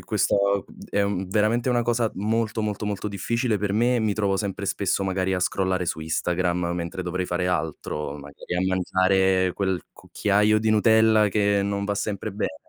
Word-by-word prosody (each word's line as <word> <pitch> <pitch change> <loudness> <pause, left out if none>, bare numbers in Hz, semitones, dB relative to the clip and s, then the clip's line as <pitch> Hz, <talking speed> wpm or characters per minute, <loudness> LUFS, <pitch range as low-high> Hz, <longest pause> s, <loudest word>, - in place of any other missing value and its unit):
questo 100 0 +1 0.3
è 100 - +1
un 95 -2 -2
veramente 110 +5 +1
una 120 -1 +2
cosa 115 -1 0
molto, 110 +2 -1
molto, 105 0 -3
molto 105 0 -3
difficile 110 +3 -1
per 100 0 -1
me 120 +4 +2
e - - +2
mi 110 -2 +1
trovo 100 -2 0
sempre 100 0 -3
spesso 100 0 0
magari 95 0 0
a 90 - 0
scrollare 95 0 0
su 80 - -2
Instagram 85 +3 -1 0.2
mentre 90 +2 -4
dovrei 90 +1 -2
fare 90 0 -1
altro, 75 -4 -3
magari 70 +5 -7
a 95 - 0
mangiare 95 0 +2
quel 95 -4 -1
cucchiaio 105 +1 +1
di 110 0 0
Nutella 110 -1 +4
che 100 0 +2
non 100 0 -2
va 100 0 -1
sempre 100 -1 -3
bene. 95 -5 -3
100 Hz, 180 wpm, -24 LUFS, 95-105 Hz, 0.3 s, Nutella